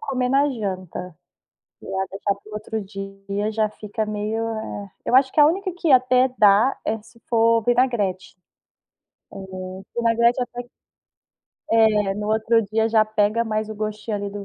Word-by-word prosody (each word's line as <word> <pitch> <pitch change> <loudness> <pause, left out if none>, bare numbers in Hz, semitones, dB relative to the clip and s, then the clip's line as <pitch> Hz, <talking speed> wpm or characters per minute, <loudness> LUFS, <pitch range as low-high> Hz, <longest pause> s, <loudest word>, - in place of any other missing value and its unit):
comer 255 -2 -1
na 280 +2 +3
janta. 185 - -5 0.7
Pra - - -13 0.2
deixar 200 +1 -1
para 200 +2 -18
o - - -11
outro 215 +1 -4
dia, 195 +1 -5
já 215 -1 0
fica 215 +1 -4
meio, 215 +1 -2
eh 220 -3 -5
Eu - - +2
acho 265 0 +5
que - - 0
a 295 - +9
única 375 +4 -1
que 340 -3 0
até 255 0 +5
dá 210 +5 +5
é 220 0 -1
se 230 +2 -20
for 230 0 +3
vinagrete. 235 -6 0 1.0
Eh, - - -10 0.6
vinagrete 235 +1 +3
até 245 0 -4
que 245 - -22 1.0
É. 215 -3 +3
No 210 +1 -4
outro 220 +1 +2
dia, 220 +2 0
já 220 -1 +4
pega 215 +1 +1
mais 215 -1 -2
o 220 - -6
gostinho, 215 0 -4
ali, 200 0 -4
do 200 0 -7
220 Hz, 165 wpm, -22 LUFS, 205-235 Hz, 1.0 s, a